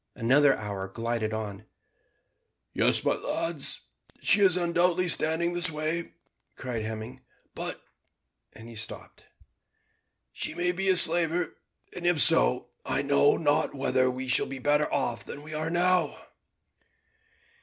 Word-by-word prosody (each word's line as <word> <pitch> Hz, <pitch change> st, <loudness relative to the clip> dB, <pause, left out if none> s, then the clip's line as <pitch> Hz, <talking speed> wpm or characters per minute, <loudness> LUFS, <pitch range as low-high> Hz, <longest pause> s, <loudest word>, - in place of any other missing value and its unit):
Another 135 Hz, +4 st, +2 dB
hour 100 Hz, -2 st, -6 dB
glided 115 Hz, +1 st, -4 dB
on. 110 Hz, -1 st, -7 dB, 1.1 s
"Yes, -, -, +4 dB
my -, -, +2 dB
lads, 165 Hz, -4 st, -3 dB, 0.4 s
she 205 Hz, -, +2 dB
is 185 Hz, -2 st, +3 dB
undoubtedly 175 Hz, +1 st, 0 dB
standing 165 Hz, +1 st, 0 dB
this 175 Hz, +1 st, +2 dB
way," 155 Hz, +2 st, -3 dB, 0.4 s
cried 125 Hz, -3 st, -6 dB
Hemming. 110 Hz, +4 st, -8 dB, 0.3 s
"But -, -, -6 dB, 0.3 s
" -, -, -43 dB
and 110 Hz, +1 st, -13 dB
he 120 Hz, -, -12 dB
stopped. 110 Hz, -1 st, -9 dB, 1.1 s
"She -, -, -5 dB
may 175 Hz, +1 st, 0 dB
be 190 Hz, +2 st, -3 dB
a 185 Hz, -, +3 dB
slaver, 170 Hz, +1 st, +4 dB, 0.4 s
and 175 Hz, -1 st, -4 dB
if 175 Hz, -3 st, +1 dB
so, -, -, +6 dB
I -, -, -2 dB
know 140 Hz, +1 st, +2 dB
not 145 Hz, -2 st, -1 dB
whether 130 Hz, -1 st, 0 dB
we 130 Hz, +1 st, -6 dB
should 130 Hz, -, +1 dB
be 135 Hz, -, -7 dB
better 145 Hz, +3 st, 0 dB
off -, -, -2 dB
than 145 Hz, -, -10 dB
we 155 Hz, -, -10 dB
now 155 Hz, -, -4 dB, 0.5 s
are." -, -, -17 dB
145 Hz, 140 wpm, -26 LUFS, 115-170 Hz, 1.1 s, so